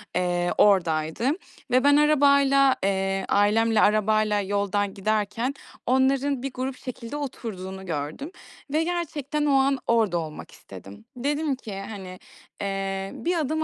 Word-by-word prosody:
eee, 175 -1 0
oradaydı. 170 +2 +2 0.4
Ve 255 +1 +4
ben 285 0 +5
arabayla, 280 -2 +4
eee, 195 0 0
ailemle 215 +2 +3
arabayla 215 0 +3
yoldan 200 0 -1
giderken 215 +5 -1 0.3
onların 265 +1 +1
bir 275 -1 -4
grup 255 0 -4
şekilde 255 +1 -7
oturduğunu 190 -9 -6
gördüm 165 - -4 0.4
ve 315 +1 +2
gerçekten 300 -4 -2
o 290 - +2
an 270 0 +3
orada 220 -6 +2
olmak 155 -2 -6
istedim. 95 - -13
Dedim 290 +3 -1
ki, 210 -6 -8
hani, 190 -4 -8 0.4
eee, 195 -1 -3
"Bir 350 +1 -1
adım 315 +1 -1
220 Hz, 130 wpm, -25 LUFS, 195-275 Hz, 0.4 s, ben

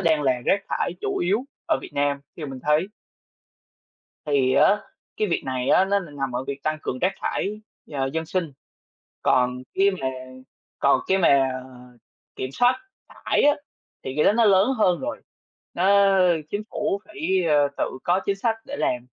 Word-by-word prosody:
đang 160 -4 +2
là 130 -2 +3
rác 200 0 +2
thải - - -1
chủ - - -2
yếu 200 +8 +1 0.2
ở - - +2
Việt - - -9
Nam, 140 0 0 0.2
theo 155 -3 -5
mình 135 -2 -7
thấy. 150 +5 +2 1.4
Thì 135 -3 +2
á 210 +1 +4 0.4
cái 215 - +1
việc 170 - 0
này 130 -1 -2
á 190 - +5
nó 200 +1 +2
n 150 -6 -10
nằm 135 -2 -2
ở 130 - -2
việc 140 0 -6
tăng 155 0 -1
cường 130 - -3
rác 185 - +2
thải, 210 +2 -2 0.3
ờ, 135 -2 -1
dân 160 0 -2
sinh. 165 -4 -2 0.7
Còn 125 0 +2
khi 200 +1 +4
mà 145 -9 -4 0.7
còn 140 - +3
cái 190 0 +2
mà 140 -6 +4 0.9
kiểm 130 - -4
soát 250 - +3 0.3
thải - - -1
á, 290 0 +5 0.5
thì 130 - -5
cái 150 - +3
đó - - +5
nó 230 +1 +3
lớn 195 +2 +5
hơn 180 -4 +3
rồi. 290 +2 -4 0.5
Nó 190 +3 +3 0.6
chính 205 +1 -2
phủ 205 -1 -1
phải, 215 - -14 0.3
ờ, 145 -1 +4
tự - - -3
có 180 +2 +2
chính 200 0 +1
sách 225 +2 0
để 285 - -5
làm, 125 0 -1
165 Hz, 180 wpm, -24 LUFS, 140-200 Hz, 1.4 s, á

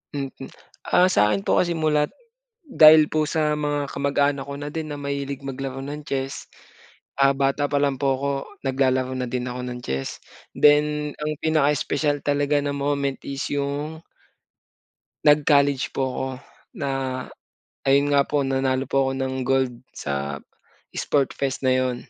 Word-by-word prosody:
Mhm. 135 -2 -5 0.4
Ah, 180 - +5
sa'kin 105 - +2
po - - +3
kasi 170 -2 -1
mulat 150 -2 +2 0.6
dahil 155 - +8
po 155 -1 +1
sa 155 -1 +1
mga 145 -1 -1
kamag-anak 140 0 0
ko 140 - -5
na 145 +1 -6
din 160 -1 -4
na 145 - -5
mahilig 140 -1 -4
maglaro 135 0 -5
ng 145 +1 -6
chess, 135 -2 -4 0.7
ah, 135 0 +4
bata 140 +1 0
pa 145 - +2
lang 140 -1 +1
po 135 0 +1
ako, 140 0 -1 0.4
naglalaro 130 -1 +1
na 130 - -2
din 125 +1 -3
ako 125 0 -5
ng 125 -1 -5
chess. 65 - -4 0.3
Then, 150 0 +3
ang 150 0 -2
pinaka-espesyal 145 -1 +1
talaga 145 0 +1
na 145 0 -2
moment 140 -1 -1
is 140 -1 -4
'yung 145 +3 -3 1.2
nag-college 145 -2 +4
po - - 0
ako, 130 +1 -3 0.5
na 140 -2 -1 1.0
ayun 140 +1 +4
nga 140 - +5
po, 145 +1 -1
nanalo 135 0 0
po 135 - -1
ako - - -2
ng 130 0 -2
gold 130 -1 +1 0.2
sa 70 0 -4 0.6
sport 140 -3 +1
fest 135 -1 -1
na 130 -1 +3
'yon. 130 -1 0
140 Hz, 150 wpm, -23 LUFS, 135-145 Hz, 1.2 s, dahil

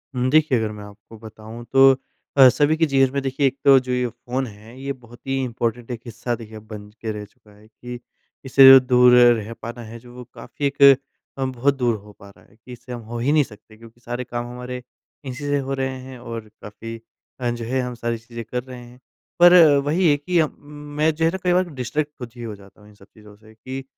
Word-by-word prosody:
हुँ, 125 0 0
देखिए 150 -2 +3
अगर 110 -1 -2
मैं 105 -1 -9
आपको 105 +2 -14
बताऊँ 110 +1 -11
तो 135 0 +7 0.5
अ, 135 -1 +9
सभी 145 +4 +2
के 165 - +3
जीवन 135 -3 +2
में 140 - -1
देखिए 135 +1 0
एक 135 - -3
तो 135 -1 +8
जो 125 - -4
ये 125 0 0
फ़ोन 125 +3 -4
है 110 +4 -14
ये 140 0 -3
बहुत 120 -2 -17
ही 135 0 -1
इम्पोर्टेंट 120 -1 -3
एक 120 -2 -6
हिस्सा 120 +1 -4
देखिए 110 -1 -12
अब 110 - -14
बन 105 -1 -9
ज - - -24
के 110 - -3
रह 105 -1 -6
चुका 105 +1 -24
है 105 +1 -20
कि 120 +2 -10 0.5
इससे 135 +1 +6
जो 135 - +10
दूर 125 -1 +4
रह 120 -3 +4
पाना 120 +2 -7
है 115 +1 -10
जो 120 +1 -16
वो 125 - -9
काफ़ी 135 +4 -6
एक 140 0 -6 0.6
अ, 135 - 0
बहुत 130 +2 0
दूर 120 -3 +1
हो 105 0 -13
पा 100 - -14
रहा 100 - -21
है - - -25
कि 115 +3 -16
इससे 120 +1 -12
हम 120 - -7
हो 120 - -4
ही 130 +5 +1
नहीं 150 -1 +4
सकते 110 -2 -16
क्योंकि 115 +1 -17
सारे 120 +1 -5
काम 120 -1 -5
हमारे 125 0 -7 0.4
इसी 130 +2 -7
से 145 0 0
हो 135 - -2
रहे 130 -1 -3
हैं 130 -1 -11
और 115 -2 -8
काफ़ी 105 +2 -9 0.4
अ, 125 -1 -1
जो 120 -1 -4
है 130 +3 -1
हम 125 0 -4
सारी 120 0 -3
चीज़ें 115 +1 -9
कर 125 +2 -4
रहे 130 -1 -10
हैं। 120 +1 -16 0.4
पर 175 0 +8 0.3
वही 165 +4 +2
है 145 - +3
कि 175 +4 0
अ, 155 - +3
मैं 150 +2 -3
जो 160 +1 0
है 165 - +3
ना 190 - -4
कई 180 -1 +2
बार 180 +1 +3
कि 180 - -11
डिस्ट्रैक्ट 145 +4 -3
खुद 125 -2 -8
ही 120 - -9
हो 110 -2 -6
जाता 100 +1 -19
हूँ 105 - -18
इन 105 - -19
सब 100 - -19
चीज़ों 105 -2 -16
से 110 +1 -19
कि, 130 +4 -7
125 Hz, 255 wpm, -22 LUFS, 115-135 Hz, 0.6 s, जो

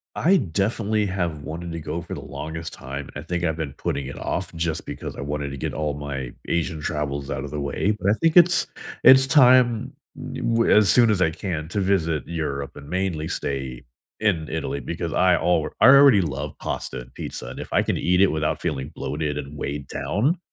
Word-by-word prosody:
I 190 +4 +4
definitely 105 - 0
have 85 -6 -2
wanted 85 +3 -6
to 85 - -4
go 85 +2 -4
for 85 - -8
the - - -6
longest 80 +1 -6
time. 70 +2 -7
I 75 - -5
think 90 +2 -3
I've 80 -1 0
been 80 -4 -4
putting 70 -2 -2
it 70 - -7
off 95 0 -3
just 80 -1 -2
because - - -6
I - - -6
wanted 70 0 -3
to 70 - -6
get - - -3
all 75 +1 -1
my 70 -4 -5 0.2
Asian 80 -2 -1
travels 70 -2 -3
out 65 - -3
of 70 - -8
the 75 - -3
way, 95 +9 0
but 100 -1 0
I - - +5
think 165 0 +3
it's 175 0 +6 0.4
it's 130 +1 +8
time 125 -3 +5 0.4
d - - -5
we're 115 0 +2
as 105 -2 +5
soon 120 -2 +5
as 100 -4 +1
I 80 -3 +3
can, 80 -3 -4
to 100 - -2
visit 85 -5 +1
Europe 70 -5 -4
and 70 0 -11
mainly 90 -4 -2
stay 65 -3 -4 0.4
in 90 -8 0
Italy 70 - -3
because 85 +4 -4
I 90 -1 +4
alr 80 -2 +1
I - - +6
already 140 -5 +8
love 70 -2 -3
pasta - - -4
and 60 0 -12
pizza, - - -6
and, - - -8
if - - -8
I - - +3
can - - -1
eat 90 +1 +2
it 100 - +7
without 80 0 -1
feeling 65 +4 -3
bloated 75 -1 -3
and 70 +1 -6
weighed 70 -1 -4
down, 135 - 0
80 Hz, 215 wpm, -23 LUFS, 75-100 Hz, 0.4 s, it's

